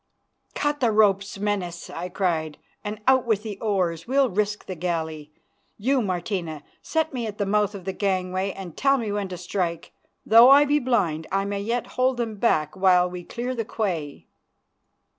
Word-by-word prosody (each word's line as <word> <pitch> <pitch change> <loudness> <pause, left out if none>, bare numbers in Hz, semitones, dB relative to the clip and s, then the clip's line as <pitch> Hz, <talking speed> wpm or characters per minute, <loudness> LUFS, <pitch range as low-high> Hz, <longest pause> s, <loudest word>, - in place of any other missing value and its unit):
"Cut 290 0 0
the 240 -3 +2
ropes, 200 -2 +2
Menas," 195 -4 -3
I 175 +2 -5
cried, 165 -5 -1 0.3
"and 210 +1 -5
out 260 -2 +4
with 215 -2 +1
the 210 -3 -6
oars. 185 -6 -1
We'll 270 0 +2
risk 205 +2 -1
the 185 - -5
galley. 160 -3 -3 0.5
You, 260 +5 +1
Martina, 175 -5 -3 0.2
set 320 -1 -1
me 240 -3 -3
at 210 -1 -7
the 205 - 0
mouth 205 +1 +1
of 190 -3 -9
the 190 - -2
gangway 185 -1 -1
and 185 -5 -9
tell 275 0 +3
me 225 -5 -3
when 205 -1 -2
to 185 -1 -7
strike. 175 -1 -3 0.3
Though 230 +3 +8
I 285 +2 +8
be 295 +1 +2
blind 195 - 0
I 195 +1 +1
may 200 0 -3
yet 235 +3 -1 0.2
hold 255 0 +3
them 225 -3 -3
back 155 -9 +1
till 180 -1 +4
we 180 -1 -7
clear 245 +7 -4
the 235 -2 -2
quay." 175 -10 -3
200 Hz, 180 wpm, -24 LUFS, 180-230 Hz, 0.5 s, Though